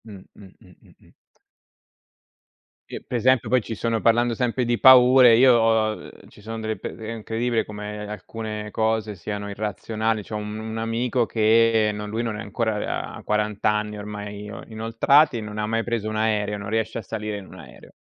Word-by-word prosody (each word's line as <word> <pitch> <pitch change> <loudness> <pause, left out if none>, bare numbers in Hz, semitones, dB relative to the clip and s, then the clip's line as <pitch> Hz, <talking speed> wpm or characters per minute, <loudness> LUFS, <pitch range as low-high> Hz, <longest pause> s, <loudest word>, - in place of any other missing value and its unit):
Mh, 100 -4 -11
mh, 100 -2 -14
mh, 90 - -19
mh, - - -21
mh. - - -23 1.8
Eh, - - -7
pre 125 - -2
esempio 125 0 +2
poi 125 +1 +3
ci 115 - -6
sono, 115 +1 -1
parlando 120 +1 +3
sempre 125 +1 -1
di 120 0 0
paure, 125 -2 +8
io, 125 -2 +6
uhm, 110 -1 +1 0.2
ci - - -18
sono 115 +2 -6
delle 110 0 -3
pe - - -7
è 110 0 -7
incredibile 115 +1 -1
come 105 0 -7
alcune 105 +1 -6
cose 110 -1 -1
siano 100 +3 -5
irrazionali. 110 +2 -2
C'ho 105 - -7
un 105 0 -5
un 110 0 -6
amico 115 +2 0
che, 110 0 +3
no, 105 0 -6
lui 110 +3 -3
non 110 -3 -3
è - - -6
ancora 110 0 -3
ha - - -10
40 105 0 0
anni 105 0 -2
ormai 105 0 -7
ino 105 -1 -8
inoltrati, 115 +5 +2
non 105 0 -7
ha 105 - -1
mai 115 +1 0
preso 115 -3 -2
un 110 - -4
aereo, 105 -1 0
non 100 0 -7
riesce 110 +1 -1
a - - -3
salire 105 -1 -5
in 100 - -9
un - - -14
aereo. - - -14
110 Hz, 190 wpm, -23 LUFS, 105-115 Hz, 1.8 s, paure